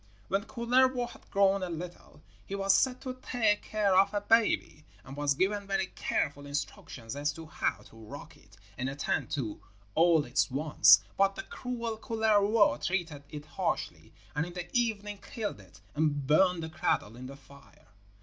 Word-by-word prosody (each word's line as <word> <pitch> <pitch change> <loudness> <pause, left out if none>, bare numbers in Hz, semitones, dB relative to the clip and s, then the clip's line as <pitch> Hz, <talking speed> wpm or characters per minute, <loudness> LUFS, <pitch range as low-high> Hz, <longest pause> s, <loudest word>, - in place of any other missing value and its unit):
When 195 +3 0
Kullervo 250 +1 +2
had - - -16
grown 195 0 +3
a 185 - -3
little, 170 -2 -8 0.2
he 195 - -4
was 195 0 +3
set 255 +5 +2
to 255 -2 -4
take 220 -4 +1
care 205 -3 +1
of 195 +2 +4
a 205 - +1
baby, 220 -8 +2 0.2
and 135 +4 -10
was 145 -1 +1
given 200 +5 0
very 195 -1 0
careful 145 0 -2
instructions 135 -4 -5
as 145 +1 0
to 160 +2 -9
how 155 - -2
to 115 - -17
rock 115 +6 -10
it 100 -1 -21 0.2
and 130 +1 -1
attend 140 0 -2
to 120 -8 -3 0.3
all 165 -2 +4
its 130 +5 +1
wants; 150 +4 +5 0.2
but 195 0 +4
the - - -5
cruel 235 -3 -5
Kullervo 220 -2 +3
treated 165 -6 -2
it 150 -1 -8
harshly, - - -3 0.2
and 155 +3 0
in 175 - -9
the 175 +3 -7
evening 210 -4 0
killed 210 - -5
it 95 -1 -17
and 145 -2 0
burned 170 +4 +3
the 160 - -5
cradle 140 -7 -1
in 125 +1 -8
the 135 +1 -10
fire. 140 0 -19
175 Hz, 175 wpm, -30 LUFS, 145-210 Hz, 0.3 s, wants